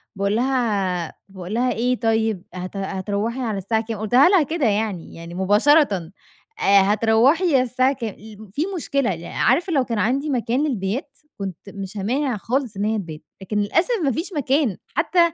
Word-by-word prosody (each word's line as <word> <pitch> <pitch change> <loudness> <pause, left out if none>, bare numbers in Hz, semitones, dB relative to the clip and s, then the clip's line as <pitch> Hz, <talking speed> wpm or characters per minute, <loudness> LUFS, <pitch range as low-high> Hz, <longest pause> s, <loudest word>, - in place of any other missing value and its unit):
باقول 200 +1 0
لها 210 -9 0 0.2
باقول 190 0 -8
لها 250 +2 +1
إيه 245 +2 0
طيب 220 -4 0
هت 185 +2 -6
هتروّحي 200 +5 -2
على 225 -5 -2
الساعة 220 +4 -1
كام؟ 220 -1 -5
قُلتها 245 - +5
لها 375 -4 +5
كده 310 0 -1
يعني 205 -5 -1
يعني 170 +1 -9
مباشرة 215 - +4 0.7
آآ 200 0 +5
هتروّحي 225 - +3
على 255 - +5
الساعة 255 +2 +1
كام 230 -6 -5
الم 215 -1 -13
في 280 +10 -4
مشكلة 275 - 0
لا 165 +1 -9
عارفة 340 +7 +2
لو 270 -3 +3
كان 230 -3 -2
عندي 270 +8 0
مكان 250 +1 0
للبيات 250 +4 -3 0.2
كنت 190 -4 -5
مش 195 +1 -7
هامانع 250 +4 -1
خالص 245 +1 -2
إن 205 - -1
هي 220 0 +1
تبات 165 -5 -6 0.2
لكن 210 +2 -3
للأسف 330 - +1
ما 275 - +2
فيش 340 - -4
مكان 275 - +1 0.2
حتى 345 +3 +1
225 Hz, 175 wpm, -22 LUFS, 200-270 Hz, 0.7 s, قُلتها